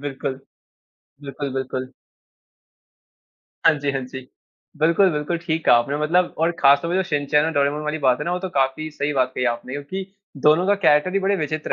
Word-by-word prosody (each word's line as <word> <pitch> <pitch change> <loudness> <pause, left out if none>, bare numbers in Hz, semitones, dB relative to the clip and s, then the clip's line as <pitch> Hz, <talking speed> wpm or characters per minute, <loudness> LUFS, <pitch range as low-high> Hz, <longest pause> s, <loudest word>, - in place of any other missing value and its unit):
बिल्कुल। 135 -1 -5 0.8
बिल्कुल, 140 0 -5
बिल्कुल। 130 0 -4 1.7
हाँ 165 - +7
जी, 140 0 -1
हाँ 135 - -2
जी। 130 0 -10 0.5
बिल्कुल, 170 +5 +4
बिल्कुल 150 +2 -2
ठीक 165 -1 -3
कहा - - +7
आपने। 130 +5 0
मतलब 175 +4 +1
और 165 +2 +2
खास 140 0 +6
तौर 170 - -3
पे 180 - 0
जो 190 - +2
शिनचैन 150 -1 +1
और 160 - 0
डोरेमॉन 145 +1 0
वाली 150 +1 -3
बात 130 -4 +2
है - - -4
ना 175 - -2
वो 180 - -1
तो 190 +1 -5
काफ़ी 155 -1 -1
सही 145 0 -2
बात 130 -2 0
कही 125 - -1
आपने। 120 +2 -9
क्योंकि, 145 +8 -5 0.3
दोनों 155 +6 +3
का 205 - +4
कैरेक्टर 180 -2 +3
ही 195 - +3
बड़े 195 +1 +1
विचित्र 155 -2 -3
150 Hz, 200 wpm, -22 LUFS, 135-170 Hz, 1.7 s, हाँ